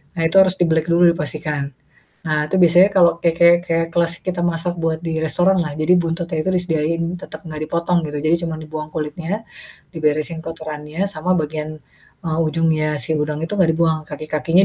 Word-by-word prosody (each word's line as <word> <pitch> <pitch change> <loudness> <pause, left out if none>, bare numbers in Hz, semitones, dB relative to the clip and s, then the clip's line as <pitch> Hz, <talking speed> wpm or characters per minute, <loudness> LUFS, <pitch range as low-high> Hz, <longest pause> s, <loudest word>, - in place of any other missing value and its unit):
nah 165 - -2
itu 165 - -5
harus 190 0 +3
dibelik 160 -1 +2
dulu, 170 0 +6
dipastikan. 150 -2 -3 0.6
Nah 155 -1 +1
itu 190 - 0
biasanya 175 +3 +6
kalau 170 -2 +6
kayak 170 -1 +2
kayak 170 0 +7
kayak 165 0 +1
kelas 170 -1 +2
kita 180 -1 -2
masak 175 0 -1
buat 160 -1 0
di 160 -1 -2
restoran 180 +4 +2
lah. 150 - -4
Jadi 155 +3 +2
buntutnya 165 0 -3
itu 190 - -3
disediain 165 -1 0 0.2
tetep 160 - -9
gak 155 -1 -6
dipotong 170 +2 0
gitu, 150 0 -4
jadi 160 +2 +4
cuman 165 -2 -3
dibuang 155 0 -6
kulitnya, 165 +7 -4 0.5
diberesin 155 +1 -1
kotorannya 160 +1 -5
sama 180 +1 0
bagian, 155 0 -4 0.5
eee, 160 0 -1
ujungnya 155 -1 +1
si 160 - 0
udang 150 0 -2
itu - - -10
gak 175 -4 +3
dibuang, 160 -1 +1
kaki-kakinya 155 +4 +1
165 Hz, 180 wpm, -20 LUFS, 155-170 Hz, 0.6 s, kayak